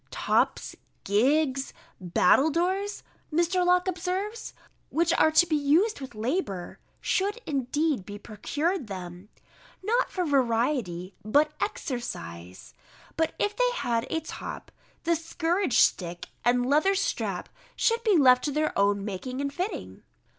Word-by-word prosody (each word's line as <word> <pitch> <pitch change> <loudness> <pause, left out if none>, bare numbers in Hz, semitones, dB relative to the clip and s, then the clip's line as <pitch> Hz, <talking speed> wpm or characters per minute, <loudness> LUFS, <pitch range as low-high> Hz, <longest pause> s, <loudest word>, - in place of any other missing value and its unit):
"Tops, - - 0 0.3
gigs, 265 +6 +1 0.3
battledores," 335 - +2 0.3
Mr. 345 +3 +2
Locke 360 +1 +3
observes, 375 +5 -3 0.3
"which 335 +1 +2
are - - +4
to 315 +3 +5
be 325 -3 0
used 305 +7 +2
with 260 -3 -8
labour, 215 - -3 0.2
should 405 +4 0
indeed 285 - 0
be 205 +2 -8
procured 290 - -2
them 185 0 -8 0.5
not 475 +5 +1
for 365 -2 -2
variety, 235 - 0
but 290 +8 +3
exercise; 85 - -5 0.4
but 320 0 0
if 415 0 0
they - - +2
had 235 - -1
a 320 - -1
top, 315 - -8 0.3
the 335 +1 +2
scourge 330 - 0
stick 175 -1 +2
and 245 0 +3
leather 310 +9 +3
strap 390 - -2 0.3
should 465 0 +1
be 420 -5 +4
left 255 -4 +6
to 295 - 0
their 305 +2 0
own 200 0 +2
making 235 +6 -5
and 280 0 -2
fitting." 365 +7 -4
295 Hz, 130 wpm, -27 LUFS, 225-355 Hz, 0.5 s, left